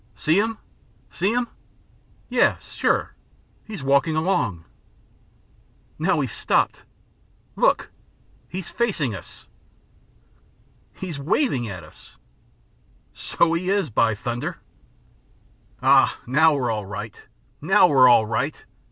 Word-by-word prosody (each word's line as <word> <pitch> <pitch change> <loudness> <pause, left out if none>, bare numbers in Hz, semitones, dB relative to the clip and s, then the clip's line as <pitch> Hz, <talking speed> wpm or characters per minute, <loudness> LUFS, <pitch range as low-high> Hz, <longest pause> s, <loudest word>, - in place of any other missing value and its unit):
See 160 +5 +2
'im? 225 +1 -1 0.5
See 190 +4 0
'im?" 245 +1 0 0.8
"Yes, - - +1
sure! - - 0 0.5
He's 210 -10 -8
walking 140 +3 +2
along." 125 - 0 1.3
"Now - - +1
he's - - -3
stopped. - - 0 0.7
Look! - - +1 0.6
He's 185 -1 -6
facing 180 - -1
us!" 95 - -11 1.4
"He's 170 -6 -7
waving 140 - 0
at 95 -3 -7
us!" - - -17 1.0
"So 165 -1 0
he 180 +2 -1
is! 200 - 0
By 110 0 +2
thunder!" 120 +3 -4 1.3
"Ah, - - +5
now 150 +5 +4
we're 125 -4 0
all 105 -3 -4
right! 105 +1 -8 0.3
Now 190 +5 +5
we're 130 -6 +6
all 110 -2 +5
right! 125 +7 -3
145 Hz, 110 wpm, -23 LUFS, 115-185 Hz, 1.4 s, we're